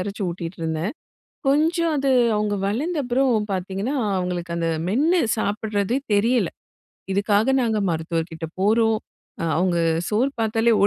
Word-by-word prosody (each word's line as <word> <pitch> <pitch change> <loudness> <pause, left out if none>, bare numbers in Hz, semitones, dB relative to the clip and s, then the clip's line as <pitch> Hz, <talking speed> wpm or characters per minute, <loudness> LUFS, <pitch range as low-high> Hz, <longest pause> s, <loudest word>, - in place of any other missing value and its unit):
அரச்சு 200 +2 -5
ஊட்டிட்டு 170 0 -6
இருந்தேன். 160 - -2 0.6
கொஞ்சம் 325 +4 +2
அது 275 0 +1 0.3
அவுங்க 210 -1 0
வளர்ந்த 300 - -1
அப்புறம் 245 -4 +1
பார்த்தீங்கன்னா, 190 +7 -2 0.2
அவுங்களுக்கு 180 -1 -3
அந்த 165 -1 0 0.2
மென்னு 310 - +3 0.2
சாப்பிடறதே 210 +2 -1 0.2
தெரியல. 225 -2 +2 0.6
இதுக்காக 205 +5 +2
நாங்க 220 -2 +1
மருத்துவர்கிட்ட 165 0 -3
போறோம், 225 +2 +3 0.4
அ - - 0
அவுங்க 175 0 +1 0.3
சோறு 235 +6 +1
பார்த்தாலே 225 +1 +2
210 Hz, 120 wpm, -23 LUFS, 180-245 Hz, 0.6 s, மென்னு